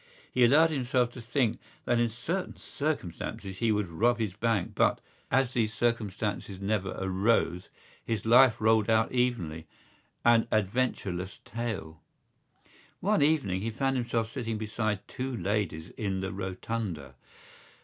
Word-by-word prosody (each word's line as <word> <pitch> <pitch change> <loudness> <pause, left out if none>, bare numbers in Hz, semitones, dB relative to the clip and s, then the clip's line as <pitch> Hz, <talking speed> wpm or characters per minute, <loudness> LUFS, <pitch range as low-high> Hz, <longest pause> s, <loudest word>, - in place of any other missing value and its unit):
He 125 - +4
allowed 155 +7 +6
himself 125 -3 +1
to 125 - -9
think 120 -1 0 0.3
that 120 - +2
in 120 0 +2
certain 165 - -3
circumstances 95 - -4
he 115 -2 +2
would 105 -2 +1
rob 115 +9 +2
his 110 -5 -2
bank 110 -3 0
but, - - +2 0.3
as 135 -2 +2
these 110 -2 0
circumstances 105 -4 -1
never 100 -1 -1
arose, 95 -2 +1 0.3
his 110 -3 -2
life 120 0 +6
rolled 110 0 +3
out 110 0 +3
evenly—an 120 +1 -1
adventureless 100 -4 -1
tale. 100 -9 -5 1.0
One 205 -1 +2
evening 140 -12 +2
he 115 - -1
found 135 +4 0
himself 115 -2 -1
sitting 115 -4 -3
beside 110 -1 -2
two 130 -1 -4
ladies 95 -7 -2
in 95 -3 -3
the 95 0 -3
Rotunda. 95 - -4
110 Hz, 130 wpm, -29 LUFS, 95-120 Hz, 1.0 s, allowed